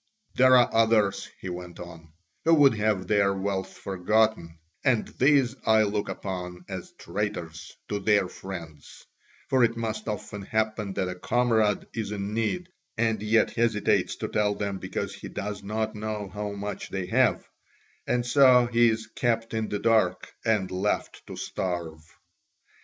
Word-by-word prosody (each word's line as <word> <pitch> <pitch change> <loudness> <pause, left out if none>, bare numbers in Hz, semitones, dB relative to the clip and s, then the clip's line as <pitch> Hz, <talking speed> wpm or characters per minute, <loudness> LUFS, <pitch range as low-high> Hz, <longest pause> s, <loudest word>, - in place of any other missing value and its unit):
There 130 0 +6
are 120 - +3
others," 110 -3 +2
he 95 - -6
went 90 0 -7
on, 80 -2 -11 0.3
"who 165 +1 +5
would 145 -4 +6
have 105 -3 0
their 100 0 +2
wealth 95 -1 -2
forgotten, 95 -2 0 0.3
and 130 -6 +2
these 135 -2 +3
I 110 0 +5
look 105 0 -1
upon 90 -2 -5
as 95 -2 -7
traitors 85 -6 -5
to 105 - -2
their 100 -2 +3
friends: 85 -6 -9 0.4
for 130 -2 +3
it 115 0 +2
must 115 -1 -3
often 105 -1 -5
happen 110 -1 -1
that 95 - -1
a 90 - -3
comrade 110 +1 +1
is 110 -3 -3
in 100 0 -4
need 140 +12 -1 0.3
and 110 -2 +1
yet 110 +1 +3
hesitates 115 -3 +1
to - - -4
tell 105 -1 +1
them 100 -2 -3
because - - -4
he - - -9
does 105 0 -5
not 110 +2 -2
know 105 -1 -4
how 105 0 -4
much 100 +1 -5
they 95 -2 -3
have, 90 - +2 0.6
and 120 -1 +1
so 125 -1 +6
he 120 0 +4
is 110 0 -2
kept 115 0 -1
in 110 -1 -1
the 105 - -1
dark 105 -4 +1
and 105 -4 +1
left 95 +3 -2
to - - -7
starve. 85 -4 -4
105 Hz, 160 wpm, -27 LUFS, 95-115 Hz, 0.6 s, There